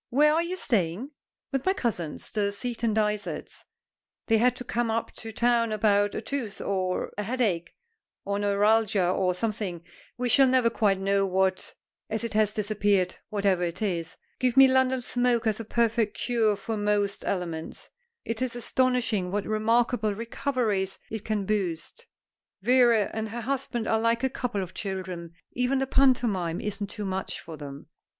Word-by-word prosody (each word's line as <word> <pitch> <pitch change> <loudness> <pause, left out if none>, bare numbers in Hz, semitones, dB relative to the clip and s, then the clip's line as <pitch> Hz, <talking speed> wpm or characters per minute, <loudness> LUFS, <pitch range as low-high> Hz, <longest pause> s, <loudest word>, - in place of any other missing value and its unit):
"Where 300 +4 +4
are 325 - +3
you 345 +2 -3
staying?" 225 - 0 0.4
"With 270 -2 -1
my 380 - +2
cousins, 180 - -3
the 205 -2 0
Seaton 235 +1 -2
Dysarts. 210 -1 -2 0.6
They 225 -1 +3
had 250 +1 +3
to 250 - -7
come 240 -1 -1
up 225 +1 -1
to 225 - -7
town 235 0 +2
about 205 -1 +2
a - - -2
tooth, 255 -8 -4
or 185 -2 -1
a - - 0
headache, 205 -7 -1 0.5
or 200 0 -1
neuralgia, 205 -1 +3
or 180 0 +1
something; 200 -4 -3 0.3
we 250 0 -1
shall 270 +3 +6
never 255 -2 +3
quite 200 -4 +2
know 195 0 +2
what, 190 0 0 0.3
as 220 +1 -2
it 230 - -3
has 215 -1 +3
disappeared, 205 -3 +1
whatever 200 -3 +1
it 175 0 -2
is. 170 -5 -2 0.2
Give 250 0 +1
me 270 0 +10
London 260 0 +2
smoke 245 -1 +1
as 220 -1 +1
a - - -4
perfect 230 -1 +1
cure 230 -4 +2
for 215 +2 -4
most 205 -1 0
ailments. 170 -4 -4 0.4
It 230 +1 -3
is 255 -1 -1
astonishing 240 -6 0
what 200 +2 -2
remarkable 220 0 +1
recoveries 225 -4 -1
it 220 -2 -4
can 210 -2 -1
boast. 200 - -3 0.6
Vera 240 -2 +4
and 220 0 -3
her 235 +3 -5
husband 250 -2 -2
are 220 - +2
like 230 +2 +1
a 265 - +1
couple 230 -7 -2
of 185 - -9
children. 185 -4 -5 0.2
Even 250 +2 0
the 270 - +1
pantomime 235 -11 +2
isn't 205 -1 -3
too 210 -1 -5
much 190 0 -3
for 160 - -9
them." 140 -2 -9
215 Hz, 165 wpm, -27 LUFS, 195-240 Hz, 0.6 s, me